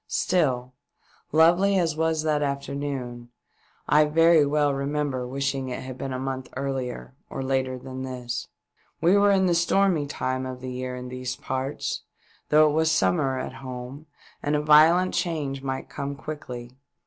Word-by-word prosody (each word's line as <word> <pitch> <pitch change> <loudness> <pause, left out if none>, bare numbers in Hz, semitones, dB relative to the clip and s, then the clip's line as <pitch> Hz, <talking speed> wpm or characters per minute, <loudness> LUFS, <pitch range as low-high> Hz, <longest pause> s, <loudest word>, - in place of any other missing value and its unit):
Still, 130 -8 0 0.6
lovely 175 +5 +5
as 165 -4 +1
was 160 -1 0
that 150 -1 +1
afternoon, 140 -4 -4 0.6
I 150 +1 +5
very 165 +1 +5
well 145 -1 +2
remember 140 -2 -2
wishing 135 0 -2
it 125 - -5
had 130 -1 -8
been 135 - -4
a 130 - -2
month 130 0 -4
earlier 130 -2 -4 0.2
or 135 - -4
later 130 -1 0
than 130 +1 -7
this. 125 -2 -4 0.5
We 175 +4 +4
were 205 0 +5
in 195 -1 +4
the 175 - +3
stormy 170 -2 +2
time 130 -2 -2
of 130 0 -6
the 130 0 -6
year 125 0 -4
in 125 0 -7
these 125 0 -4
parts, 130 +3 -3 0.5
though 155 +1 +6
it 150 - +1
was 160 +1 +2
summer 115 - +2
at 130 - -4
home, 130 +3 -8 0.3
and 145 +1 0
a 150 - +1
violent 160 +5 +6
change 155 -6 -2
might 130 -1 -4
quickly 140 -3 -6
come. 125 - -26
140 Hz, 160 wpm, -25 LUFS, 130-155 Hz, 0.6 s, though